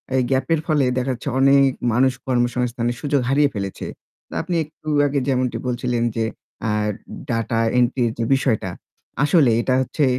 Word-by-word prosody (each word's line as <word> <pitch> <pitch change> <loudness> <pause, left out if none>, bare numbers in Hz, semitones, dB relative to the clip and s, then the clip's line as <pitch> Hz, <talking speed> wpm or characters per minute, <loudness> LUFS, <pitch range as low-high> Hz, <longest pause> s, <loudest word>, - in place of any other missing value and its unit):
এই 130 - +3
গ্যাপ 130 0 +1
এর 155 - +1
ফলে 150 -5 +3
দেখা 130 +1 0
যাচ্ছে 125 +3 -5
অনেক 135 0 +5 0.2
মানুষ 130 +2 +3
কর্মসংস্থানের 120 -1 0
সুযোগ 145 -2 +1
হারিয়ে 145 +1 +3
ফেলেছে। 100 -3 -5 0.4
তো - - -12
আপনি 175 - -3
একটু 155 0 -19 0.2
আগে 140 0 0
যেমনটি 130 -2 0
বলছিলেন 120 -1 -1
যে 115 - 0 0.4
আ - - +1 0.6
ডাটা 115 0 0 0.2
এন্ট্রির 120 -1 +2
যে - - +1
বিষয়টা 110 -7 0 0.5
আসলে 145 -4 +4
এটা 130 - 0
হচ্ছে 140 +3 0
130 Hz, 160 wpm, -21 LUFS, 120-140 Hz, 0.6 s, অনেক